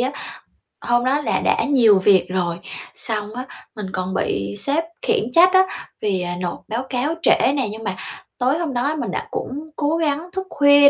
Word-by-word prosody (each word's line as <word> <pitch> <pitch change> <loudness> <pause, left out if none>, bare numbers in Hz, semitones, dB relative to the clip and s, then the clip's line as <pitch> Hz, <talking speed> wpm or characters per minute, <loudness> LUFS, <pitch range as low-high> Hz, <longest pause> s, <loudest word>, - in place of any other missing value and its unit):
á. 255 +2 +1 0.7
Hôm 240 0 +2
đó 280 +3 +2
là - - 0
đã - - +2
nhiều 235 -8 +5
việc 190 0 +5
rồi 180 -2 -1 0.4
xong 210 -2 -2
á, 255 - -4 0.3
mình 210 -3 -5
còn 185 0 -2
bị 100 - -1
sếp 295 +4 +2 0.2
khiển 230 - 0
trách 360 +6 +6
á, 375 - +7 0.4
vì, 195 -3 0
à, 175 0 -3
nộp 175 - -3
báo 230 +4 -2
cáo 270 +5 0
trễ - - +4
nè, 270 -5 0
nhưng 220 +1 -8
mà 190 -3 -2 0.4
tối 260 +4 +2
hôm 325 -6 -2
đó 275 +5 0
mình 310 - -3
đã - - -3
cũng 300 +4 -5
cố 300 +2 0
gắng 320 +1 -1
thức 380 0 -4
khuya 285 -1 +7
250 Hz, 200 wpm, -21 LUFS, 205-290 Hz, 0.7 s, á